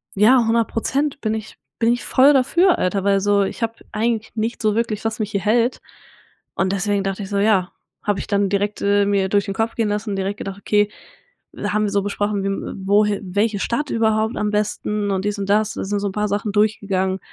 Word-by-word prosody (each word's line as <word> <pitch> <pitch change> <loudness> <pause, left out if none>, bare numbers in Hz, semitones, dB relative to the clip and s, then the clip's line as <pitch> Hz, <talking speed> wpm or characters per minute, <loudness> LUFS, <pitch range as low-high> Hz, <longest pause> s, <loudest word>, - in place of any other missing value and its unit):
ja, 220 +6 +6
100% 245 +5 0
bin 215 -1 -1
ich 220 0 -7 0.2
bin 235 0 +3
ich 245 - -4
voll 275 +3 +5
dafür, 340 +7 +3
Alter, 190 +1 0
weil 200 -1 +3
so 205 0 +3
ich 195 - -4
hab 230 0 -3
eigentlich 225 0 -1
nichts 225 +1 -3
so 215 -1 +2
wirklich, 225 -2 -2
was 225 0 -2
mich 210 -1 -2
hier 200 - 0
hält“ 230 +5 +1 0.8
und 190 +1 0
deswegen 200 0 0
dachte 195 +1 -3
ich 190 - -8
so, 200 - -1
ja, 200 -3 +2 0.3
hab 205 -1 0
ich - - -6
dann 200 -1 +1
direkt, 205 +1 -1
äh, 200 0 +3
mir 200 -1 +1
durch 200 0 +2
den 195 - -3
Kopf 225 +2 -1
gehen 225 -2 0
lassen, 210 0 -2
direkt 195 +1 -2
gedacht: 195 0 -6
„Okay“, 210 0 +1 0.6
da - - -3
haben 215 0 +2
wir - - 0
so 200 0 +1
besprochen, 205 0 -1
wie 195 - 0
w 195 -1 -5
wohi 205 0 +3
welche 205 +3 0
Stadt 250 +8 -1
überhaupt 220 0 +1
am 210 0 -1
besten 210 0 -1
und 190 0 -1
dies 205 0 -2
und 195 0 -4
das. 215 +1 +2
Da - - -4
sind 205 +1 -1
so 205 - -2
'n - - -8
paar 210 +1 0
Sachen 205 +1 -1
durchgegangen, 195 -3 +1
210 Hz, 225 wpm, -21 LUFS, 200-220 Hz, 0.8 s, ja